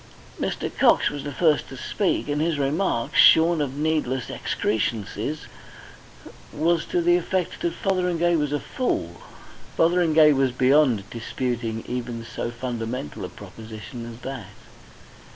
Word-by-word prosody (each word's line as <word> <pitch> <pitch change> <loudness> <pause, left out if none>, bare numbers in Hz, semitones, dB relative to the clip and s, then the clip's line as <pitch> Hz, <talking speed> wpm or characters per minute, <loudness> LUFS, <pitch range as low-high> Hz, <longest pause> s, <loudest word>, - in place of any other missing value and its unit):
Mr. - - -3
Cox - - +4
was 145 -1 -6
the 145 - -5
first 155 +1 +2
to 135 - -9
speak, 195 +5 -1
and 145 0 -1
his 160 -1 0
remark, 140 -3 -1
shorn 165 0 +6
of 140 -1 -3
needless 150 -5 -1
excrescences, 110 +6 -2 1.1
was 165 +2 +1
to 175 - 0
the 175 +1 +5
effect 180 0 -2
that 170 - -1
Fotheringay 180 -3 +1
was 150 -3 0
a 145 - 0
fool. 85 - -3 0.6
Fotheringay 165 -3 +5
was 135 -2 +2
beyond 130 -5 +3
disputing 115 -1 -3
even 120 -2 -4
so 120 0 -4
fundamental 120 - -5
a - - -5
proposition 115 +2 -9
as 115 +2 -12
that! 130 -7 -6
140 Hz, 135 wpm, -24 LUFS, 120-165 Hz, 1.1 s, shorn